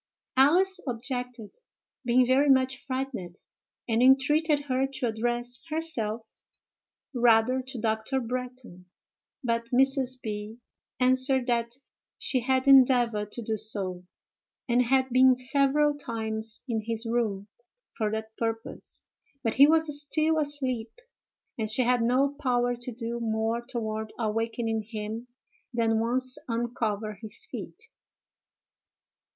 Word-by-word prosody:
Alice 365 Hz, +8 st, +4 dB
objected, 245 Hz, -2 st, -5 dB, 0.5 s
being 250 Hz, 0 st, +4 dB
very 270 Hz, +3 st, +3 dB
much 260 Hz, 0 st, +2 dB
frightened, 255 Hz, -10 st, -4 dB, 0.5 s
and 230 Hz, 0 st, +1 dB
entreated 290 Hz, +4 st, +4 dB
her 265 Hz, -1 st, 0 dB
to 270 Hz, -2 st, -4 dB
address 240 Hz, +2 st, -2 dB
herself 235 Hz, -9 st, -1 dB, 0.8 s
rather 240 Hz, +1 st, +3 dB
to 260 Hz, -1 st, -6 dB
Dr. 220 Hz, +4 st, -1 dB
Bretton; 250 Hz, -6 st, -6 dB, 0.6 s
but 230 Hz, -1 st, -1 dB
Mrs. 260 Hz, 0 st, +2 dB
B. 215 Hz, 0 st, -6 dB, 0.4 s
answered 260 Hz, 0 st, +3 dB
that 235 Hz, -1 st, -1 dB, 0.4 s
_she 255 Hz, -, +2 dB
had 260 Hz, +2 st, 0 dB
endeavored 245 Hz, -6 st, +5 dB
to 240 Hz, -, -5 dB
do 220 Hz, 0 st, -1 dB
so, 190 Hz, -4 st, -1 dB, 0.6 s
and 240 Hz, 0 st, +3 dB
had 260 Hz, +1 st, +2 dB
been 255 Hz, +1 st, +6 dB
several 280 Hz, +3 st, +2 dB
times 220 Hz, -4 st, -4 dB
in 225 Hz, -3 st, -1 dB
his 225 Hz, +1 st, -3 dB
room 220 Hz, -4 st, -1 dB, 0.5 s
for 215 Hz, -4 st, -1 dB
that 220 Hz, +1 st, -5 dB
purpose, 225 Hz, 0 st, -4 dB, 0.4 s
but 225 Hz, -, 0 dB
he 280 Hz, +2 st, +7 dB
was 310 Hz, -2 st, +2 dB
still 310 Hz, +2 st, +1 dB
asleep, 260 Hz, -6 st, -2 dB, 0.7 s
and 215 Hz, -1 st, 0 dB
she 235 Hz, +4 st, +4 dB
had 245 Hz, 0 st, +2 dB
no 260 Hz, +4 st, +2 dB
power 245 Hz, -2 st, +1 dB
to 240 Hz, +1 st, -5 dB
do 235 Hz, 0 st, -4 dB
more 225 Hz, 0 st, -1 dB
toward 220 Hz, -3 st, -4 dB
awakening 225 Hz, 0 st, -1 dB
him 220 Hz, +2 st, -6 dB, 0.4 s
than 225 Hz, -2 st, +1 dB
once 255 Hz, +3 st, -1 dB
uncover 225 Hz, -3 st, -2 dB
his 220 Hz, -2 st, -3 dB
feet_. -, -, -7 dB
240 Hz, 120 wpm, -27 LUFS, 225-260 Hz, 0.8 s, he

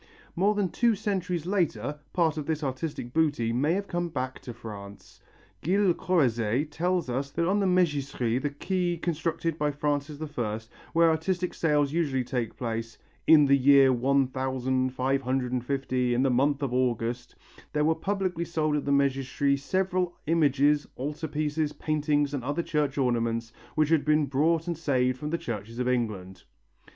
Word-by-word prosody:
More 200 Hz, +4 st, +2 dB
than 200 Hz, -3 st, 0 dB
two 235 Hz, +5 st, +2 dB
centuries 185 Hz, -5 st, -2 dB
later, 170 Hz, -6 st, -1 dB
part 165 Hz, -3 st, +2 dB
of 150 Hz, -2 st, -5 dB
this 160 Hz, -1 st, -1 dB
artistic 130 Hz, -2 st, -4 dB
booty 145 Hz, -8 st, +1 dB
may 145 Hz, +7 st, +2 dB
have 200 Hz, +2 st, -2 dB
come 175 Hz, -1 st, -2 dB
back 130 Hz, -4 st, -4 dB
to 125 Hz, -, -8 dB
France. 105 Hz, -4 st, -10 dB, 0.4 s
Gilles 190 Hz, +1 st, +3 dB
Corrozet 130 Hz, -5 st, +1 dB
tells 180 Hz, +1 st, 0 dB
us 135 Hz, +3 st, -2 dB
that 170 Hz, +4 st, -1 dB
on 200 Hz, +3 st, +2 dB
the 195 Hz, -, +2 dB
Mégisserie, 145 Hz, -9 st, +1 dB
the 145 Hz, -, -1 dB
quay 175 Hz, +4 st, -1 dB
constructed 165 Hz, -1 st, -2 dB
by 150 Hz, 0 st, +1 dB
Francis 145 Hz, 0 st, -2 dB, 0.2 s
I, 110 Hz, -2 st, -1 dB, 0.3 s
where 165 Hz, 0 st, +5 dB
artistic 180 Hz, +3 st, -1 dB
sales 150 Hz, -3 st, +1 dB
usually 145 Hz, -6 st, 0 dB
took 120 Hz, -3 st, -3 dB
place, 115 Hz, -1 st, -4 dB, 0.3 s
"in 150 Hz, -2 st, +8 dB
the 140 Hz, 0 st, +5 dB
year 135 Hz, -1 st, +6 dB
one 135 Hz, +3 st, +2 dB
thousand 130 Hz, 0 st, -1 dB
five 130 Hz, +1 st, 0 dB
hundred 130 Hz, -1 st, -1 dB
and 125 Hz, -2 st, -1 dB
fifty, 130 Hz, -2 st, 0 dB
in 125 Hz, -, +2 dB
the 135 Hz, -, +2 dB
month 140 Hz, +3 st, +2 dB
of 130 Hz, -3 st, -1 dB
August, 120 Hz, -1 st, -1 dB, 0.4 s
there 150 Hz, 0 st, +1 dB
were 160 Hz, -, +4 dB
publicly 185 Hz, 0 st, -2 dB
sold 155 Hz, -3 st, 0 dB
in 145 Hz, -, -1 dB
the -, -, -2 dB
Mégisserie 140 Hz, 0 st, +1 dB
several 185 Hz, +3 st, -1 dB
images, 145 Hz, -2 st, +3 dB
altar 150 Hz, +4 st, -4 dB
pieces, 150 Hz, 0 st, -1 dB
paintings 145 Hz, -2 st, 0 dB
and 135 Hz, -4 st, -3 dB
other 145 Hz, +6 st, -1 dB
church 150 Hz, -4 st, -1 dB
ornaments, 115 Hz, -3 st, 0 dB, 0.2 s
which 155 Hz, -1 st, +2 dB
had 160 Hz, -3 st, +3 dB
been 150 Hz, 0 st, +3 dB
brought 155 Hz, +4 st, +1 dB
and 170 Hz, -3 st, -3 dB
saved 130 Hz, -5 st, +1 dB
from 150 Hz, -, -4 dB
the 170 Hz, -, 0 dB
churches 115 Hz, -4 st, -6 dB
of 125 Hz, 0 st, -1 dB
England." 105 Hz, -7 st, -2 dB
145 Hz, 170 wpm, -27 LUFS, 130-165 Hz, 0.4 s, in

